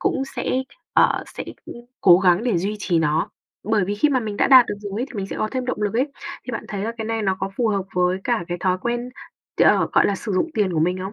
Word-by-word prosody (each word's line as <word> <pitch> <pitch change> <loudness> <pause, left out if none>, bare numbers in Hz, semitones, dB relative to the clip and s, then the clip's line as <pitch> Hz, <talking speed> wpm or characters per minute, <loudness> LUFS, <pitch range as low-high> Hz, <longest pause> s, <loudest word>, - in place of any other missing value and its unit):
cũng 270 - 0
sẽ, - - -2 0.4
ờ, - - +3
sẽ - - -7 0.6
cố 180 -2 +7
gắng 185 +2 +3
để 225 -9 +1
duy 205 +4 -2
trì 175 -5 0
nó. 155 0 0 0.3
Bởi 210 -3 +1
vì 205 - -2
khi 300 - +3
mà 260 -2 +2
mình 210 -2 -5
đã - - +3
đạt 255 -3 +8
được - - -3
rồi 205 +1 -5
ấy 255 - -1
thì - - -14
mình 195 -2 -3
sẽ - - -6
có 215 - 0
thêm 255 -1 -2
động 230 -4 -2
lực 205 0 -1
ấy. 260 +5 +1 0.4
Thì - - -6
bạn - - -4
thấy 200 -1 -4
là 230 - -2
cái 220 - -3
này 225 0 -2
nó 190 -2 0
có - - -2
phù 235 -3 +1
hợp 200 -2 0
với 180 +1 +2
cả 235 -7 0
cái 175 - -2
thói 185 -1 +1
quen, 240 +4 -3 0.5
t - - -4
ờ, - - +4
gọi - - +4
là, 200 - +1
sử 210 0 -5
dụng 250 - 0
tiền 200 -5 +1
của 155 - 0
mình 180 +3 +1
không? 190 +2 -5
205 Hz, 285 wpm, -22 LUFS, 185-235 Hz, 0.6 s, đạt